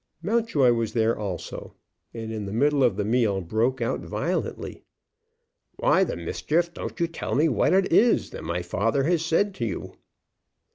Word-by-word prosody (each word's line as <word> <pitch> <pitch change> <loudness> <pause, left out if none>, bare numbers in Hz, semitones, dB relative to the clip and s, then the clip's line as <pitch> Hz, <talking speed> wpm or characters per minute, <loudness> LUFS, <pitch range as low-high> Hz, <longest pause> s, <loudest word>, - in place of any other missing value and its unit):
Mountjoy 205 - +2
was 115 -2 -2
there 115 0 +2
also, 100 -4 -6 0.4
and 115 -1 -6
in 105 -2 -4
the - - -5
middle 140 +5 +2
of 120 -6 +3
the 105 0 -2
meal 110 -3 +2
broke 115 +8 0
out 115 - -1
violently: - - -3 0.9
"Why - - +3
the - - -2
mischief 165 - -1
don't - - -7
you 170 - +3
tell 165 0 -4
me 150 +4 +4
what 120 -9 +2
it 190 -2 +2
is 230 +6 +4
that - - -8
my 85 +2 -2
father 110 +10 0
has 165 +2 +1
said 195 +5 +1
to 120 - -3
you?" - - -5
120 Hz, 175 wpm, -25 LUFS, 105-165 Hz, 0.9 s, me